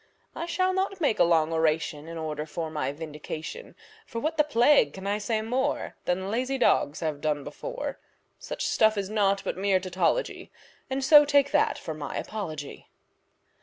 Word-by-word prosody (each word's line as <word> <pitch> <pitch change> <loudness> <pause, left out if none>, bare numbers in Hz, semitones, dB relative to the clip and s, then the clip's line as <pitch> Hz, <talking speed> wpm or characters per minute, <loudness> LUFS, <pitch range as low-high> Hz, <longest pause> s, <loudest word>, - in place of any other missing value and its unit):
I 335 - -4
shall 370 +2 +1
not 385 0 -1
make 285 -9 +1
a - - +7
long 165 -2 +3
oration 160 -1 0
in 165 0 -7
order 155 -1 -4
for 160 0 -4
my 150 -3 -2
vindication, 155 - -7 0.3
For 230 - -4
what 310 +6 -1
the 300 - +4
plague 245 - +4
can 190 0 -9
I 205 +1 0
say 215 +1 -1
more 265 +6 -1
Than 190 +2 -1
lazy 255 +4 -1
dogs 155 - +2
have 155 -3 -2
done 150 -2 -1
before; - - -6 0.4
Such - - -4
stuff 220 -1 +3
is 200 0 -3
naught 200 -2 +2
but - - -3
mere 195 -1 +2
tautology, 185 - -1 0.4
And 270 0 -2
so 295 +1 +8
take 285 -1 +3
that 295 0 +2
for 160 - -6
my 150 -1 -5
apology. 155 -9 -6
200 Hz, 175 wpm, -27 LUFS, -, 0.4 s, so